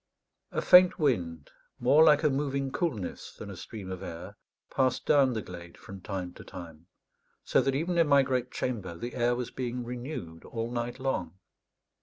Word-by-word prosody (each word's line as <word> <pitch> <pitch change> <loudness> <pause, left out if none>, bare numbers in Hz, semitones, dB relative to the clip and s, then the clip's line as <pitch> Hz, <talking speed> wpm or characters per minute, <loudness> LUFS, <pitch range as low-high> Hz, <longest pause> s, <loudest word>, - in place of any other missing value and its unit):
A - - -2
faint 180 0 +7
wind, 85 - -1 0.3
more 140 +6 +6
like 150 -1 +5
a 150 - +4
moving 135 -1 -1
coolness 125 - -3
than - - -8
a - - -8
stream 100 -4 -8
of 95 - -6
air, 90 +5 -8 0.4
passed 130 -2 +1
down 135 -3 +4
the 110 -2 -3
glade 85 -1 -10
from 95 -1 -11
time 90 -2 -5
to - - -12
time; 85 -2 -11 0.6
so - - +3
that 135 -1 0
even 170 +4 0
in 165 - +4
my 140 -1 +6
great 130 -2 -1
chamber 105 -9 -3
the 120 +7 -6
air 120 0 +1
was 125 0 -4
being 125 -1 -3
renewed 120 - -6
all 115 0 -4
night 120 0 -3
long. 95 -10 -2
120 Hz, 180 wpm, -29 LUFS, 95-135 Hz, 0.6 s, faint